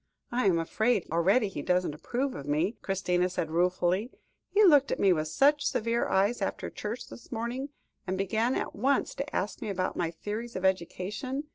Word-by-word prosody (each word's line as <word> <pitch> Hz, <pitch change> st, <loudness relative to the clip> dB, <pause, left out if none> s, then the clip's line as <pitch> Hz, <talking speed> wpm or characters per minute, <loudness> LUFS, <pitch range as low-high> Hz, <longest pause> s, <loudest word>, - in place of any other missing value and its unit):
"I 240 Hz, -3 st, +1 dB
am 180 Hz, -3 st, +4 dB
afraid 215 Hz, +5 st, +1 dB
already 190 Hz, +8 st, +3 dB
he 185 Hz, -7 st, -5 dB
doesn't 180 Hz, -1 st, +1 dB
approve 250 Hz, -, -2 dB
of 140 Hz, -, -7 dB
me," 160 Hz, +9 st, +1 dB
Christina 180 Hz, -2 st, 0 dB
said 165 Hz, -3 st, -3 dB
ruefully; 180 Hz, +5 st, +1 dB, 0.4 s
"he 425 Hz, -, +4 dB
looked 290 Hz, -8 st, +6 dB
at -, -, -1 dB
me 195 Hz, -2 st, +5 dB
with 155 Hz, -2 st, -1 dB
such 285 Hz, -, +3 dB
severe 230 Hz, +2 st, 0 dB
eyes 200 Hz, +4 st, +2 dB
after 195 Hz, -, -3 dB
church 215 Hz, +4 st, -5 dB
this -, -, -13 dB
morning, 245 Hz, +4 st, -3 dB, 0.4 s
and 185 Hz, +1 st, -1 dB
began 220 Hz, +6 st, +1 dB
at -, -, -2 dB
once 270 Hz, +6 st, +1 dB
to 280 Hz, +2 st, -5 dB
ask 205 Hz, +8 st, -2 dB
me 220 Hz, -, -3 dB
about 185 Hz, -2 st, -1 dB
my 170 Hz, -2 st, 0 dB
theories 210 Hz, +8 st, -6 dB
of 185 Hz, 0 st, -2 dB
education. 190 Hz, -, -1 dB
200 Hz, 185 wpm, -29 LUFS, 180-245 Hz, 0.4 s, looked